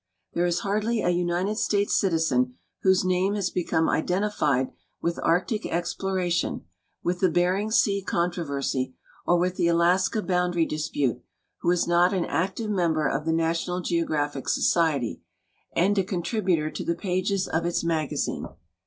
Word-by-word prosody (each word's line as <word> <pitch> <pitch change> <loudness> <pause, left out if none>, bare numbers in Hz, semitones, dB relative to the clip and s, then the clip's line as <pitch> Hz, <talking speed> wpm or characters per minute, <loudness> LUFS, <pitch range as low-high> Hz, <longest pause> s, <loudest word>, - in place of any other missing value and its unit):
There 175 +1 +1
is 175 0 0
hardly 215 +3 0
a 175 - +3
United 175 +4 0
States 205 -2 +1
citizen 160 -9 +1 0.3
whose 190 -1 +3
name 185 +2 +1
has 195 -3 -1
become 165 -2 0
identified 155 -8 +1 0.3
with 170 0 -2
Arctic 210 +6 +1
exploration, 175 0 -1 0.4
with 175 +1 -1
the 185 - +3
Bering 180 +5 +1
sea 200 -2 +2
contro 175 -1 -1
versy, 140 -3 -2 0.3
or 175 - +4
with 180 +1 0
the 170 - +2
Alaska 180 +5 +2
boundary 180 -2 +1
dispute 145 -5 -1 0.4
who 175 - 0
is 175 -1 +2
not 175 +2 +4
an 180 - 0
active 190 +8 -1
member 165 -6 +1
of 140 +3 -2
the 165 - +1
National 165 +2 0
Geographic 150 -5 -1
Society 155 -8 +1 0.5
and 195 +4 +2
a - - +2
contributor 180 -4 -1
to - - -5
the 170 - -1
pages 185 +2 -1
of 160 +1 -1
its 175 - -1
magazine. 160 -3 -1
175 Hz, 150 wpm, -26 LUFS, 165-190 Hz, 0.5 s, or